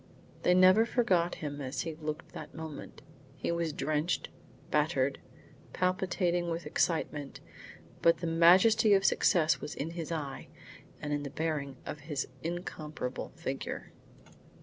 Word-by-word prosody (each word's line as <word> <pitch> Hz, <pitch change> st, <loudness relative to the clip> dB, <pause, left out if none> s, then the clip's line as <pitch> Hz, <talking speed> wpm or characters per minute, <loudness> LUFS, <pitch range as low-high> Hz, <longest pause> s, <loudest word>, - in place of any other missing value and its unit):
They 180 Hz, -, +4 dB
never 185 Hz, +4 st, +7 dB
forgot 185 Hz, -8 st, +2 dB
him 145 Hz, 0 st, -4 dB
as 130 Hz, +1 st, -3 dB
he 165 Hz, -, -4 dB
looked 155 Hz, 0 st, -5 dB
at -, -, -24 dB
that -, -, -9 dB
moment. 160 Hz, -2 st, -8 dB, 0.3 s
He -, -, -2 dB
was 170 Hz, -1 st, 0 dB
drenched, 155 Hz, +3 st, -1 dB, 0.4 s
battered, 140 Hz, -3 st, +1 dB, 0.5 s
palpitating 180 Hz, -1 st, 0 dB
with 165 Hz, +1 st, -3 dB
excitement; 150 Hz, -4 st, -1 dB, 0.6 s
but 165 Hz, 0 st, +5 dB
the 170 Hz, -, -5 dB
majesty 185 Hz, +6 st, +6 dB
of 195 Hz, 0 st, +2 dB
success 165 Hz, -4 st, +3 dB
was 150 Hz, -, -5 dB
in 155 Hz, +4 st, -3 dB
his 170 Hz, -1 st, -5 dB
eye 145 Hz, -4 st, -4 dB, 0.5 s
and 150 Hz, 0 st, -3 dB
in 145 Hz, -, 0 dB
the 140 Hz, -, -5 dB
bearing 145 Hz, -3 st, -2 dB
of 150 Hz, -, -5 dB
his 145 Hz, -1 st, -3 dB
incomparable 155 Hz, -6 st, -4 dB
figure. -, -, -5 dB
165 Hz, 140 wpm, -31 LUFS, 150-175 Hz, 0.6 s, never